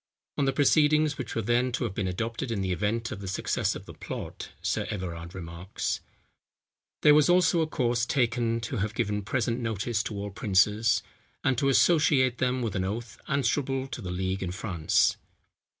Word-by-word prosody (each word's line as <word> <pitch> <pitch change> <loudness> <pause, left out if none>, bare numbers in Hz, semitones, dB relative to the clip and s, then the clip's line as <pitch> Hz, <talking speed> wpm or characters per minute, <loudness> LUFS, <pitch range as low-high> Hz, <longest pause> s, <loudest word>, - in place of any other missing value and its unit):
On 140 - +1
the 135 - +3
proceedings 150 +1 +3
which 130 - -5
were 115 - 0
to 120 +3 +1
have 115 -5 -2
been 95 -1 -2
adopted 115 +7 -3
in 110 -4 -1
the 95 -1 -1
event 110 +5 -1
of 100 - -5
the 100 - -6
success 95 - -1
of - - -8
the - - -10
plot, - - -7
Sir - - -1
Everard 85 -3 -5
remarks: 85 +1 -4 1.0
"There 150 - +8
was 150 +1 +5
also 175 -1 +4
a 160 - +1
course 120 -5 0
taken 115 -3 +1
to 115 +2 -4
have 105 +1 -2
given 105 0 0
present 120 +2 -1
notice 110 -1 -1
to 110 - -4
all 100 0 -4
princes, 105 +2 +2 0.4
and 135 - +2
to 135 - +2
associate 135 -4 +4
them 125 -1 +1
with 110 -4 -2
an 95 - 0
oath, 110 +4 -5
answerable 135 0 0
to - - -6
the 90 - -5
league 95 +1 -2
in 90 -2 -2
France." 90 -5 +1
115 Hz, 180 wpm, -28 LUFS, 100-130 Hz, 1.0 s, There